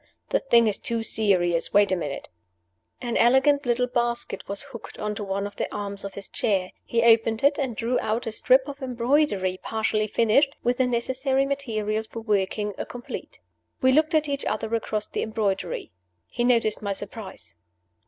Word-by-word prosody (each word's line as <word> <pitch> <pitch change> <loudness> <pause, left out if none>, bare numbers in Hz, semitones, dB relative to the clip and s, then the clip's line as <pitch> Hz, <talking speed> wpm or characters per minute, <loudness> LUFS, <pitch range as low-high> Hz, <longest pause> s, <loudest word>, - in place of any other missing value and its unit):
The - - +2
thing 235 -4 +4
is 205 -2 0
too 230 -1 -1
serious. 180 -6 +1
Wait 205 -1 +5
a - - +3
minute!" 145 -6 -4 0.7
An 240 -2 -3
elegant 265 +3 +4
little 245 +1 +2
basket 240 -4 -2
was 200 +4 -3
hooked 270 -5 -10
on 210 0 -2
to 210 - -5
one 200 0 -2
of 205 - -8
the - - -2
arms 200 -1 -5
of 200 -1 -7
his 200 - -6
chair. 190 -4 0
He 230 -1 0
opened 225 0 +4
it, 285 +1 +4
and 260 -5 -1
drew 235 +4 0
out 220 +2 -1
a 225 - -2
strip 260 +5 +3
of 280 0 -8
embroidery 240 -7 +1
partially 220 -1 0
finished, 235 +7 +3
with 245 +1 +1
the 255 - +2
necessary 260 +3 0
materials 220 -6 -2
for 230 - -7
working, 210 -1 0
a - - -1
complete. 245 0 -8 0.4
We 260 - +6
looked 310 +4 +3
at 310 -1 +3
each 280 -1 -2
other 220 +1 -2
across 215 -2 -1
the - - -4
embroidery. 210 - -2 0.3
He 240 - -3
noticed 230 -3 +2
my 200 -1 -1
surprise. 195 - -8
225 Hz, 185 wpm, -25 LUFS, 205-255 Hz, 0.7 s, We